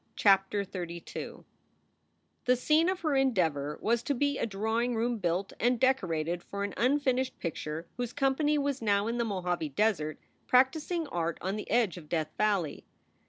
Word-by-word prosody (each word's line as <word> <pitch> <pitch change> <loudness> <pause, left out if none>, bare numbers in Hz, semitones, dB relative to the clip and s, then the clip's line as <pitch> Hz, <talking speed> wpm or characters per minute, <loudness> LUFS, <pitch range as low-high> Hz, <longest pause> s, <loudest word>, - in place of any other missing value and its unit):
CHAPTER 195 0 +3
XXXII 175 -3 -7 1.0
PHE 250 - +4
scene 310 +7 +3
of 375 -1 -2
her 310 -3 0
endeavor 165 - +1
was 235 +1 +2
to 280 - -1
be 285 +2 0
a - - 0
drawing 225 +4 -1
room 230 +2 +1
1 235 - -2
built 180 +1 -1
and 245 0 +2
decorated 175 -10 +1
for 200 +2 -5
an 200 - -3
unfinished 260 0 +1
picture 160 -1 -4
whose 245 -1 -2
company 290 +3 +1
was 280 -2 -1
now 200 -2 +2
in 235 +2 -2
the 235 - +1
Mojave 180 -6 -2
Desert 155 -2 0 0.3
practicing 305 +6 +2
art 170 -1 -2
on 190 +2 -2
the 210 - -6
edge 225 -6 +2
of 155 -4 -11
Death 155 -2 -1
Valley. 200 -8 0
215 Hz, 165 wpm, -30 LUFS, 175-260 Hz, 1.0 s, PHE